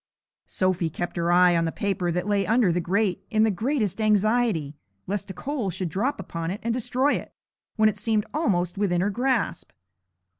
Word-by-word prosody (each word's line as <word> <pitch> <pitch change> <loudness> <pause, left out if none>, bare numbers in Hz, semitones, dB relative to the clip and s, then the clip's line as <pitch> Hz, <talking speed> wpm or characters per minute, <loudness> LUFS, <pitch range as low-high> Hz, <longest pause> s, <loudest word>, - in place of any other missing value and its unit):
Sophy 185 -3 0
kept 175 +3 -5
her 170 0 0
eye 180 0 +5
on 165 0 +2
the 165 - -1
paper 190 -2 -1
that 180 +1 -2
lay 205 -1 +2
under 225 -4 +3
the 175 +1 0
grate 190 +1 0
in 220 -2 +3
the 220 - +3
greatest 220 - -1
anxiety, 215 -7 +2 0.3
lest 200 +1 -3
a - - -5
coal 265 -6 -3
should 180 0 -3
drop 250 - -1
upon 165 -1 -4
it 195 +3 -4
and 230 0 0
destroy 255 +4 +1
it, - - -5 0.4
when 215 -1 +4
it 215 -1 -1
seemed 215 -1 0
almost 190 - 0
within 175 -4 +1
her 200 +2 +1
grasp. 245 -5 -1
200 Hz, 190 wpm, -25 LUFS, 175-225 Hz, 0.4 s, eye